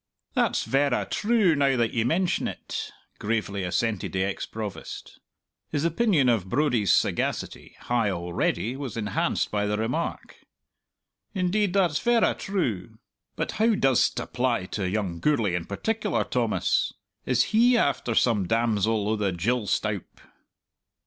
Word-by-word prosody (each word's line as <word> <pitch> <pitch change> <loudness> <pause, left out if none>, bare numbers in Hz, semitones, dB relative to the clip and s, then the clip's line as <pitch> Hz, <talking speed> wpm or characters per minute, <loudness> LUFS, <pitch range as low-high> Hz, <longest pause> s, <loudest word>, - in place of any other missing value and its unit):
"That's - - +1
verra 135 -1 +1
true, 210 -6 +2
now 140 -2 +2
that 115 -2 +1
ye 115 - +1
mention't," 175 +8 -1 0.3
gravely 105 -3 -2
assented 105 +3 -1
the 95 0 +1
ex 100 0 -3
Provost. 110 -3 -7 0.5
His 145 +2 -1
opinion 170 - +2
of 110 -6 +1
Brodie's 120 - +2
sagacity, - - -1
high 120 -4 +1
already, 90 +6 -1
was 135 -4 -6
enhanced 105 -3 -1
by 105 0 0
the 105 0 0
remark. 125 +10 -3 1.0
"Indeed, 190 +1 +1
that's 180 -7 +2
verra 240 -1 +3
true. 125 - -3 0.4
But - - -2
how 225 0 +4
does't 135 -8 +2
apply 120 -4 -1
to 95 -3 -1
young 95 -4 -2
Gourlay 115 - +1
in 90 -2 -2
particular, 210 - -1
Thomas? 120 -4 0 0.4
Is 125 -1 +3
he 240 +3 +5
after 135 - 0
some 105 -7 +2
damsel 110 -1 +1
o' 110 - +1
the 105 -3 0
gill 105 +6 -1
stoup?" 105 -3 -2
120 Hz, 135 wpm, -26 LUFS, 105-150 Hz, 1.0 s, he